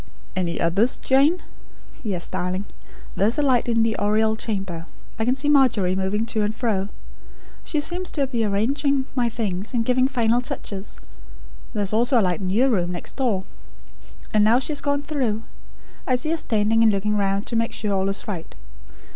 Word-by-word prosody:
"Any 175 -2 -1
others, 200 +9 +2
Jane?" 285 +7 +3 0.6
"Yes, 190 -6 -3
darling. 185 +1 -2 0.5
There 200 - +3
is 230 - 0
a 295 - +2
light 250 -4 +2
in 230 -1 +3
the 225 -1 +1
Oriel 220 +1 +2
chamber. 195 -7 -4 0.3
I 220 - +1
can 250 +2 +2
see 280 +2 -2
Margery 245 -11 +4
moving 195 +3 0
to 225 -1 -1
and 210 +1 -1
fro. 205 -5 -1 0.7
She 305 - -1
seems 355 +4 -2
to 285 -3 +1
be 240 -4 -1
arranging 265 +7 +1
my 245 -3 +1
things, 210 -1 -3
and 230 -1 +1
giving 255 +1 +3
final 240 -2 +2
touches. 200 -5 -5 0.7
There 210 - 0
is 200 - -2
also 240 +3 +4
a - - +3
light 180 +1 0
in 185 - -2
your 250 +8 +3
room, 180 -5 +1
next 175 - -7
door. 230 -8 0 0.9
Ah, 215 - +4
now 215 +3 +5
she 260 +4 -2
has 290 - -1
gone 285 0 0
through. 250 -8 -1 0.6
I 255 - +3
see 310 +6 -1
her 330 - +1
standing 220 -4 +1
and 225 -1 +6
looking 210 +1 0
round 195 0 0
to 235 - -4
make 230 0 +1
sure 210 -2 -2
all 190 0 +1
is 195 +4 -1
right. 180 -6 -5
220 Hz, 190 wpm, -23 LUFS, 195-255 Hz, 0.9 s, and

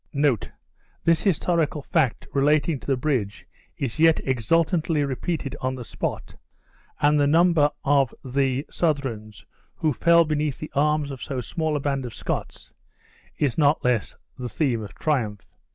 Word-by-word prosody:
This 165 -1 +3
historical 165 -5 0
fact 130 -3 0
relating 145 +2 +2
to - - -14
the 135 -2 +1
bridge 125 -7 -2 0.3
is 135 +1 -3
yet 165 0 +5
exultantly 155 - +1
repeated 140 +2 -3
on 130 0 -1
the 125 -2 -7
spot, - - -5 0.6
and 150 0 +3
the 145 - +3
number 165 -1 +4
of 140 -3 +3
the 135 +1 0
Southrons 130 - -2 0.3
who 155 -2 0
fell 170 +4 +4
beneath 150 -2 -1
the 155 - -7
arms 150 0 +1
of 135 - -8
so 135 -3 -4
small 155 +6 -2
a - - 0
band 140 -1 -1
of 115 - -10
Scots, - - -5 0.6
is 145 +1 0
not 150 0 +3
less 120 -4 0 0.2
the 125 -1 -4
theme 125 -4 0
of 100 -5 -9
triumph. 110 - -1
145 Hz, 150 wpm, -24 LUFS, 130-155 Hz, 0.6 s, yet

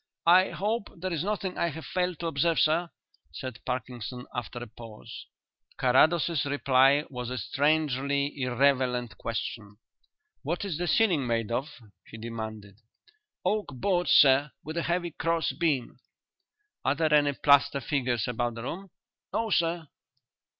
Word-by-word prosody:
"I 180 +2 +6
hope 210 +1 -2
there 185 +1 -3
is 160 -1 -1
nothing 195 -2 -3
I - - +2
have 160 0 -6
failed 180 -2 -1
to - - -3
observe, 165 +1 +1
sir," 165 +3 +2 0.4
said 125 +9 -7
Parkinson, 125 -1 -4
after 125 -1 -5
a 120 - -5
pause. 115 -1 -11 0.5
Carrados's 155 +4 +3
reply 140 0 +3
was 125 -2 -5
a 130 - -4
strangely 140 +2 0
irrelevant 125 -3 +1
question. 110 -2 -5 0.6
"What 170 +7 -3
is 170 -5 -3
the 175 - -1
ceiling 170 - +2
made 115 -1 -1
of?" 130 +6 -1 0.3
he 110 - -12
demanded. 110 -3 -7 0.7
"Oak 215 0 0
boards, 180 +6 0
sir, 140 +1 +6
with 155 +2 -6
a - - +1
heavy 175 0 0
cross 165 +1 0
beam." 150 -8 -1 0.8
"Are - - +2
there 155 0 +1
any 145 -1 +4
plaster 140 0 +4
figures 125 -4 -1
about 120 -1 -2
the 115 - -7
room?" 190 +9 -6 0.4
"No, 225 -1 -1
sir." 165 -2 +1
140 Hz, 145 wpm, -28 LUFS, 125-170 Hz, 0.8 s, I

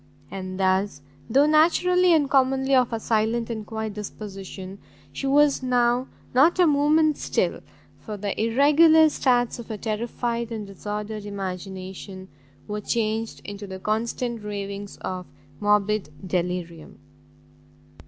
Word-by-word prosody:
And 185 -1 -6
thus, 190 -5 +1 0.3
though 275 +5 +5
naturally 350 +4 +4
and 310 -4 +4
commonly 265 0 +2
of 250 -2 +4
a 230 - -2
silent 225 +1 0
and 220 -2 -4
quiet 220 -1 -4
disposition, 195 -2 -8 0.3
she 275 - -3
was 285 0 +4
now 245 0 +2 0.3
not 290 +8 +5
a 360 - +5
moment 300 0 +3
still, - - 0 0.4
for 210 -1 -7
the 200 0 -2
irregular 300 +7 +6
starts 245 -4 +1
of 235 - -9
a 215 - -4
terrified 235 +2 -3
and 220 -2 -4
disordered 210 +2 -6
imagination, 190 -1 -6 0.4
were 210 0 -4
changed 220 0 -2
into 205 0 -7
the 190 0 -6
constant 225 +3 -2
ravings 200 -1 -6
of 185 -1 -4 0.3
morbid 210 -2 +1 0.2
delirium. 175 -2 -3
220 Hz, 125 wpm, -24 LUFS, 200-260 Hz, 0.4 s, irregular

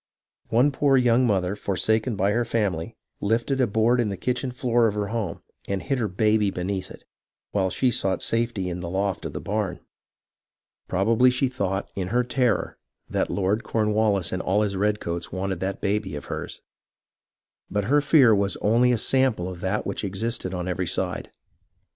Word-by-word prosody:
One 125 +6 +4
poor 135 -1 +3
young 125 0 +4
mother 95 -2 +1
forsaken 105 +5 0
by 100 +1 +1
her 120 +3 +1
family 100 -8 -2 0.2
lifted 120 +6 0
a 125 - +3
board 110 +4 +2
in 115 -3 +1
the 100 - -4
kitchen 125 +3 -1
floor 120 -2 +2
of 105 - -2
her 105 -1 -2
home 110 -7 -3 0.2
and 100 -1 -1
hid 135 +6 -2
her 110 - 0
baby 105 +2 +2
beneath 95 +1 -3
it, - - -12 0.5
while 95 -2 +1
she 125 +6 +1
sought 95 -4 0
safety 115 -5 0
in 90 0 -4
the 85 -1 -5
loft 95 0 -1
of - - -9
the - - -4
barn. 100 -3 -2 1.1
Probably 110 +7 +3
she 125 +2 +1
thought, 100 -6 -2
in 95 -2 -3
her 120 +5 +1
terror, 125 0 0 0.3
that - - 0
Lord 100 +3 0
Cornwallis 105 -4 +1
and 95 - -2
all 100 +3 +1
his 100 -2 -1
redcoats 90 -4 -1
wanted 95 -1 -3
that 95 +2 -3
baby 100 -5 -1
of 75 - -7
hers. - - -6 1.1
But 105 0 -1
her 145 +6 +3
fear 140 -6 +6
was 100 -1 +1
only 120 +4 +3
a 120 - +2
sample 125 -6 +1
of 90 -1 -7
that 95 +3 -1
which 100 - -3
existed 100 0 -2
on 90 -1 -4
every 90 0 -2
side. - - -2
105 Hz, 180 wpm, -25 LUFS, 95-120 Hz, 1.1 s, fear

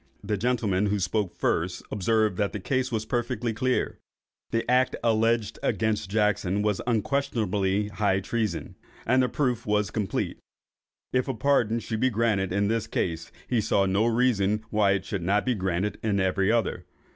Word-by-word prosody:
The 105 +1 -1
gentleman 105 -3 +1
who 105 +1 +1
spoke 95 0 -1
first 90 +2 -1
observed 110 0 +1
that 100 -1 0
the 105 - -3
case 130 +5 -1
was 110 -2 -1
perfectly 120 -1 -1
clear; 130 +4 -1 0.5
the 115 0 -1
act 125 +1 +3
alleged 115 -1 +1
against 110 -4 0
Jackson 105 -2 +1
was 105 -2 0
unquestionably 105 -5 0
high 100 -2 +1
treason; 110 +2 -2 0.3
and 130 +3 +4
the 125 - +1
proof 125 -6 -1
was 105 0 +1
complete. 105 -3 -2 0.7
If 130 +1 +1
a 135 - -2
pardon 115 -2 +2
should 110 -1 -3
be 130 - +3
granted 105 -5 +1
in 100 +2 +1
this 115 0 0
case, 85 -1 -2 0.2
he 120 -3 +1
saw 100 -1 +2
no 100 +4 +2
reason 110 -3 +2
why 105 -2 +3
it 95 - -2
should 100 - -3
not 100 +4 +1
be 130 - +2
granted 95 0 -2
in 105 -3 0
every 95 +2 +2
other. 115 -3 -1
105 Hz, 170 wpm, -26 LUFS, 100-115 Hz, 0.7 s, and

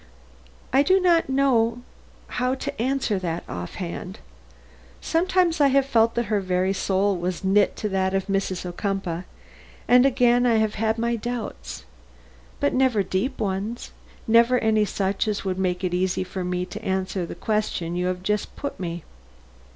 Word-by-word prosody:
"I 270 - +6
do 375 +6 +4
not 345 -5 +3
know 245 -3 +2 0.4
how 250 +1 -1
to 280 -1 -5
answer 255 -5 0
that 170 -2 -3
offhand. 170 - -6 0.8
Sometimes 350 -1 +1
I 285 - +6
have 275 0 +3
felt 230 -4 +2
that 235 0 0
her 210 -1 0
very 185 0 0
soul 195 +1 +1
was 180 +1 -3
knit 195 +1 +3
to 210 - -3
that 190 0 0
of 195 - 0
Mrs. 195 -2 -2
Ocumpaugh, 180 -1 -3 0.6
and 250 0 +6
again 245 -2 +3
I 235 - +3
have 220 -1 +2
had 220 +1 0
my 235 +1 0
doubts. 220 - -5 0.8
But - - +1
never 255 -6 +3
deep 195 +9 -2
ones; 205 +4 -3 0.4
never 235 +2 +5
any 220 -2 +2
such 195 0 -1
as 210 -2 -2
would 185 -1 -2
make 180 -1 -1
it 180 -1 -1
easy 185 +1 0
for 185 0 -5
me 180 0 -2
to 215 +4 -9
answer 190 -2 -2
the - - -7
question 210 -6 -2
you 180 +1 0
have 180 0 -3
just 210 +1 -1
put 285 - -5
me." 170 -2 -4
210 Hz, 165 wpm, -24 LUFS, 185-245 Hz, 0.8 s, I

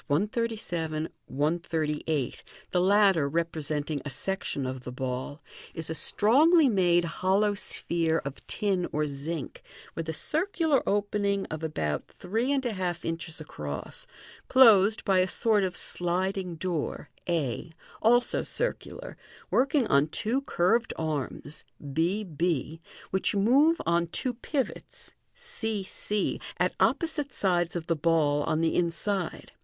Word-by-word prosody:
137, 175 -4 -1 0.2
138, 150 -4 -1 0.3
the 180 - +2
latter 190 -6 +4
representing 155 -2 -2
a 145 - -5
section 190 -3 -2
of 130 0 -4
the 125 - -6
ball) 130 +3 -4 0.3
is 160 -1 -4
a - - 0
strongly 290 - +5
made 175 -6 +3
hollow 190 +5 +1
sphere 170 -4 0
of 140 0 -7
tin 195 -4 0
or 150 0 0
zinc, 145 +1 -5 0.3
with 165 -1 -4
a - - +1
circular 315 - +1
opening 200 -1 0
of 160 0 -4
about 75 - -2
three 225 +9 -2
and 270 -2 0
a 240 - 0
half 180 -3 -3
inches 165 0 -4
across, 75 - -5 0.4
closed 220 -5 +6
by 195 -2 +4
a 185 - +3
sort 215 +1 +2
of 185 -1 -2
sliding 180 +1 -1
door, 165 -2 -3 0.2
a, 165 -1 -1 0.3
also 240 +2 +3
circular, - - -4 0.4
working 275 0 +3
on 140 -3 +3
two 230 - 0
curved 230 0 +1
arms, 150 -1 -3 0.3
b 175 +8 +1
b, 165 -2 -2 0.3
which 190 +2 +1
move 275 +11 +4
on 170 +1 +2
two 245 +9 -2
pivots, 260 +3 -4 0.2
c 225 - -3
c, 205 +2 -2 0.2
at - - +1
opposite 315 -5 +1
sides 175 -5 0
of 170 -2 -3
the 165 - +1
ball 150 -2 +2
on 155 - 0
the 165 - +2
inside. 175 +2 -1
175 Hz, 130 wpm, -28 LUFS, 155-210 Hz, 0.4 s, closed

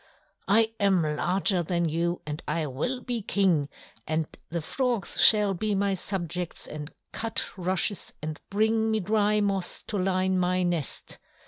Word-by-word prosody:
"I 220 +3 +4
am 195 -4 +3
larger 180 +5 +1
than 170 0 0
you, 170 +2 -1
and 150 +1 -4
I 155 +1 -1
will 200 - -3
be 240 -2 -3
King, 180 -8 +1 0.4
and 155 +1 0 0.2
the 170 - -2
frogs 235 - -1
shall 210 -2 +7
be 210 +3 -1
my 200 0 +1
subjects 180 -2 -3
and 150 +1 -7 0.2
cut 225 0 0
rushes 185 +2 0
and 155 -1 -6
bring 220 +2 +2
me 220 0 +1
dry 210 +1 +2
moss 195 -3 -1
to 205 - -2
line 185 0 +1
my 180 0 +1
nest." 175 -6 -2
185 Hz, 150 wpm, -27 LUFS, 170-210 Hz, 0.4 s, shall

